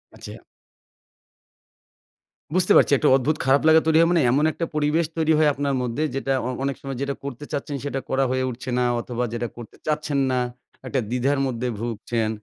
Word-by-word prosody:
আচ্ছা। - - -10 2.2
বুঝতে 185 - +2
পারছি - - +4
একটা - - +1
অদ্ভুত 150 +4 0
খারাপ 135 +1 +4
লাগা 160 0 +7
তৈরি 160 - +4
হয়, 165 +1 +5
মানে 170 -3 +3
এমন 145 +4 +2
একটা 165 - -3
পরিবেশ 150 +2 +1
তৈরি 160 0 +3
হয় 155 -1 +4
আপনার 140 0 -1
মধ্যে 125 +5 -2
যেটা 135 0 -1
অ - - -2
অনেক 140 -1 -1
সময় 135 -2 -5
যেটা 140 0 -2
করতে 140 +1 -6
চাচ্ছেন, 145 +1 -3
সেটা 140 -1 -2
করা 135 0 +2
হয়ে 130 0 0
উঠছে 125 +2 -7
না 125 - +2 0.2
অথবা 120 0 -3
যেটা 120 0 -2
করতে 120 -3 -10
চাচ্ছেন 150 -2 0
না, 125 - +1 0.5
একটা 130 - 0
দ্বিধার 130 +3 +1
মধ্যে 125 -1 -2
ভুগছেন, 115 -1 -2
140 Hz, 185 wpm, -23 LUFS, 125-150 Hz, 2.2 s, লাগা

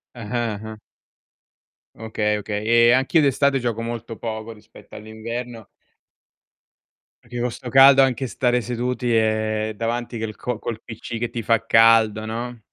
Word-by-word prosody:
Ah-ah, 115 -2 -3
ah. 110 0 -8 1.2
Okay, 105 -1 -1
okay, 105 0 -4
e 120 +1 +5
anch'io 135 +6 +3
d'estate 140 0 +2
gioco 120 -2 -2
molto 115 -1 -6
poco 110 0 -6
rispetto 105 -1 -16
all'inverno 115 +2 -7 1.5
perché 120 0 -7
con 120 +1 0
'sto 125 +1 -8
caldo 135 +1 +7
anche 130 0 +1
stare 125 +1 0
seduti 125 +1 -2
è 110 0 0
davanti 120 +1 -3
che 110 - -3
il 110 - -7
co 125 -3 -4
col 115 -1 -5
PC 115 +1 -7
che 120 0 -3
ti 120 - -5
fa 115 +1 +1
caldo, 115 -1 +4
no? 120 +2 -5
115 Hz, 145 wpm, -22 LUFS, 110-120 Hz, 1.5 s, caldo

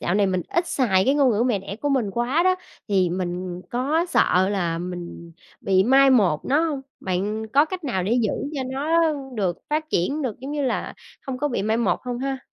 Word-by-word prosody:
dạo 175 - -1
này 205 -1 +3
mình 185 -2 0
ít 340 0 0
xài 195 -8 +2
cái 270 - +3
ngôn 275 -4 +4
ngữ 215 +1 +1
mẹ 240 -4 +1
đẻ 195 +1 -7
của 290 +6 -2
mình 255 -7 +1
quá" 240 - +1
đó, 370 0 +4 0.3
thì 190 -3 +2
mình 180 0 -4
có 285 +8 0
sợ 190 - +3
là 175 -5 -1
mình 175 -1 -7 0.3
bị 190 -1 +3
mai 270 +3 +6
một 195 - +3
nó 285 +3 +2
hông? 295 -4 -2 0.2
Bạn 205 +4 -2
có 285 +2 +6
cách 365 0 -6
nào 190 -9 -1
để 200 - -1
giữ 215 - +1 0.2
cho 275 - -2
nó 315 +4 +2 0.2
được 185 -5 -1
phát 310 +1 -1
triển 280 - 0
được, 245 -6 -3
giống 270 +2 -6
như 295 - -1
là, 255 -3 -2 0.3
hông 260 -2 -4
có 295 +2 0
bị 240 - -2
mai 220 +2 +1
một 230 -5 0
hông 245 -1 -4
ha? 270 0 -2
235 Hz, 225 wpm, -23 LUFS, 190-275 Hz, 0.3 s, mai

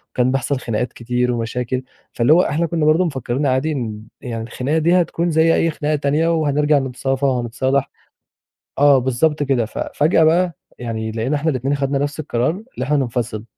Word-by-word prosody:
كان 125 0 +2
بيحصل 135 0 -1
خناقات 120 +1 -3
كتير 125 +1 -1
ومشاكل، 125 +2 -2 0.3
فاللي 120 +6 +4
هو 175 - +6
إحنا 165 +2 0
كنا 160 -2 -1
برضه 160 +4 +4
مفكرين 135 -2 -2
عادي 135 +4 +1
إن 110 -6 -4 0.2
يعني 115 -2 -5
الخناقة 130 +6 -2
دي 175 +3 +3
هتكون 170 0 -1
زي 160 +1 +4
أي 165 - +2
خناقة 150 0 -1
تانية، 145 +3 +1
وهنرجع 150 -1 +2
نتصافى 135 +1 -2
وهنتصالح 130 +2 0 0.9
آه 140 -1 +6
بالضبط 135 +4 +1
كده، 135 -5 +1
ف - - -8 0.2
فجأة 160 +2 +3
بقى 170 0 +2 0.2
يعني 110 -2 -4
لقينا 120 +7 -1
إحنا 160 +2 0
الاتنين 135 +1 -1
خدنا 140 0 -1
نفس 145 +2 -2
القرار، 125 -2 0 0.2
اللي - - -3
إحنا 150 +1 +1
ننفصل، 120 -4 -2
135 Hz, 175 wpm, -19 LUFS, 125-155 Hz, 0.9 s, هو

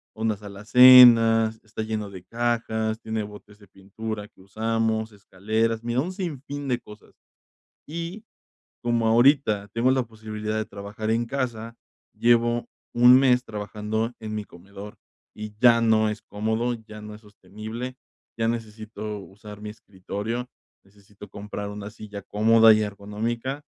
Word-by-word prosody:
Unas 110 -2 -2
alacenas, 115 +1 +7
está 110 0 -6
lleno 110 -2 -4
de 95 -2 -11
cajas, 115 0 -1
tiene 110 -2 -3
botes 105 0 -12
de 100 - -18
pintura 105 +2 -7
que 95 - -23
usamos, 110 +2 -1
escaleras, 110 +3 -2
mira, 120 +2 0
un 180 - -4
sin 175 -8 -5
fin 145 -1 -6
de 125 -2 0
cosas. 105 0 -16 0.7
Y, 170 +7 -6 0.6
como 120 -1 +1
ahorita 115 -4 +3
tengo 120 +3 +2
la 130 -1 +2
posibilidad 110 -1 -6
de 110 - -2
trabajar 100 +2 -7
en 115 +1 +1
casa, 115 -4 -4 0.4
llevo 120 0 +2 0.3
1 125 +2 +7
mes 125 -2 +3
trabajando 105 +2 -3
en 110 -1 -6
mi 105 - -4
comedor, 100 +3 -12 0.4
y 105 0 -8
ya 120 0 +6
no 110 -1 +3
es 105 - -6
cómodo, 110 +4 -2
ya 110 -1 -10
no 105 0 -9
es 105 - -14
sostenible, 110 +4 -8 0.4
ya 115 - +1
necesito 110 -2 -5
usar 105 +2 -12
mi 105 - -6
escritorio. 105 +4 -6 0.4
Necesito 100 +1 -16
comprar 105 0 -6
1 105 0 -7
silla 105 -2 -9
cómoda 110 +3 +5
y 110 - +1
ergonómica. 115 +7 -4
110 Hz, 145 wpm, -24 LUFS, 105-120 Hz, 0.7 s, alacenas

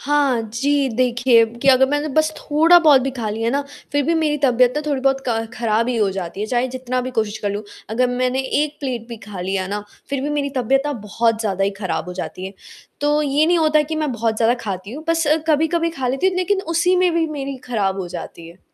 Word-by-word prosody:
हाँ 280 -4 +1
जी, 280 +3 +1
देखिए 240 0 +3 0.2
कि - - +2
अगर 265 0 +6
मैंने 290 +2 -1
बस 310 +2 +2
थोड़ा 320 +4 +5
बहुत 300 -5 +6
भी 270 +1 -2
ख़ा 235 -4 -4
लिया 225 +2 -1
ना 280 +3 +1 0.3
फ़िर 285 0 +2
भी 335 - +1
मेरी 305 -2 +1
तबीयत 250 -1 +4
ना - - +1
थोड़ी-बहुत 270 -2 +1
क 230 -2 +1 0.2
ख़राब 230 0 0
ही 250 - 0
हो 210 -3 +2
जाती 190 0 -5
है। 210 - -1
चाहे 245 +2 0
जितना 255 0 -3
भी 255 +1 -4
कोशिश 220 -1 -1
कर 205 -1 -2
लूँ 205 +1 -4 0.3
अगर 250 +3 +2
मैंने 255 +1 0 0.2
1 300 0 -4
प्लेट 250 -5 -4
भी 235 - -7
ख़ा 200 -3 -7
लिया 190 +1 -2
ना 205 +1 -3 0.3
फ़िर 275 - -1
भी 290 - -2
मेरी 290 -1 -1
तबीयत 265 +2 +2
ना 290 - -1
बहुत 225 0 -1
ज़्यादा 195 -3 0
ही 200 - +1
ख़राब 185 -5 -2
हो - - -5
जाती 185 0 -5
है। 195 - -9 0.5
तो 295 +1 +2
ये 295 +1 +2
नहीं 345 0 +3
होता 310 -1 +3
कि 315 +2 -4
मैं 305 -3 -1
बहुत 225 -1 -1
ज़्यादा 230 +1 +3
खाती 195 0 -5
हूँ। 305 +3 -8
बस 330 -1 +1 0.2
कभी-कभी 320 +2 +2
ख़ा 265 -6 -3
लेती 270 +8 0
हूँ 370 - -3
लेक़िन 385 +2 +1
उसी 355 +3 +3
में 365 0 +3
भी 330 -1 +2
मेरी 275 -3 -5
ख़राब 200 -5 0
हो 180 - -5
जाती 170 -1 -8
है। 170 +2 -16
255 Hz, 240 wpm, -20 LUFS, 220-295 Hz, 0.5 s, अगर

